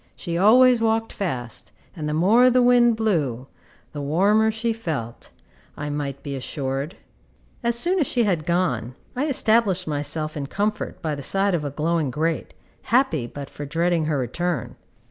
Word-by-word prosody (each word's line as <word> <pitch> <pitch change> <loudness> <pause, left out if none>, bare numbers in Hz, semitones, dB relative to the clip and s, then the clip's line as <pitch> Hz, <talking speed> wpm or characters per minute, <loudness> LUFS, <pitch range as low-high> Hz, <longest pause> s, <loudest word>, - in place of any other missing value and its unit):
She 170 -3 -5
always 240 +6 +6
walked 225 0 0
fast, 120 - -4 0.2
and 155 -3 -4
the 150 - -1
more 220 +10 +5
the 250 0 +4
wind 240 -1 +5
blew, 155 - -1 0.5
the 145 - -6
warmer 200 +10 +3
she 225 +1 -1
felt, 150 - -5 0.5
I 145 0 -4
might 140 -2 -4
be 140 -1 -4
assured. 135 +3 -4 0.7
As 235 0 +1
soon 360 +9 +1
as 300 - +2
she 240 - +1
had 175 -7 0
gone, 170 -8 0 0.2
I 275 +5 0
established 220 - +2
myself 155 +1 -2
in 140 -2 -4
comfort 210 +4 -3
by 155 -2 -1
the 140 - -5
side 195 +7 +1
of 165 -4 0
a 145 - -2
glowing 155 +1 0
grate, 160 +5 -2 0.3
happy 215 - +2
but 140 +2 -8
for 145 - -8
dreading 165 +2 0
her 155 -2 0
return. 140 +3 -2
170 Hz, 165 wpm, -23 LUFS, 145-220 Hz, 0.7 s, always